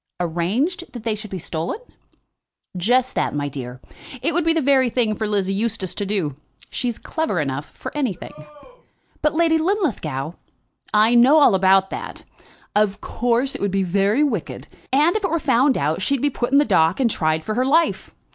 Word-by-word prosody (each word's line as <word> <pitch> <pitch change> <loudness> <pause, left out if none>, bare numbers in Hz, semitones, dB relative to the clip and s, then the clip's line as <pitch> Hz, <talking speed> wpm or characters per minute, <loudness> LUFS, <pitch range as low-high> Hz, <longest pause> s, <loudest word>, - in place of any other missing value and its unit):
"Arranged 195 - -1
that 240 -3 -8
they 225 -1 0
should 215 0 -7
be 190 - -5
stolen?" 165 - -3 1.0
"Just 245 +8 +1
that, - - -1
my 145 0 -1
dear. 125 -3 -7 0.4
It - - +1
would 345 +2 +1
be 330 - +3
the 325 - +1
very 270 -3 +3
thing 230 -3 +1
for 215 - -2
Lizzie 195 -2 0
Eustace 210 -3 -2
to 205 - -4
do. 185 -9 -1 0.4
She's 240 -3 -2
clever 315 - -2
enough 140 -1 -3
for - - -9
anything." 255 - -3 0.9
"But, 300 0 +1
Lady 325 -1 +3
Linlithgow 255 - -1 0.4
" - - -31 0.2
"I 235 - +2
know 255 +6 +6
all 285 - +6
about 190 0 +3
that. - - -7 0.5
Of 205 -1 +2
course, 245 +5 0
it - - -6
would 200 - +1
be 195 0 0
very 200 +8 +2
wicked, 225 - -3 0.2
and 300 +7 +3
if 430 - -1
it 385 - +1
were 330 - +1
found 265 -2 +2
out 155 +5 -1
she'd 275 +7 +1
be 290 - +2
put 240 0 -3
in 280 - +5
the 290 - +5
dock 160 - +2
and 260 - +3
tried 160 -6 -1
for 215 - -2
her 250 +4 +1
life. 315 +6 +1
225 Hz, 195 wpm, -21 LUFS, 185-280 Hz, 1.0 s, know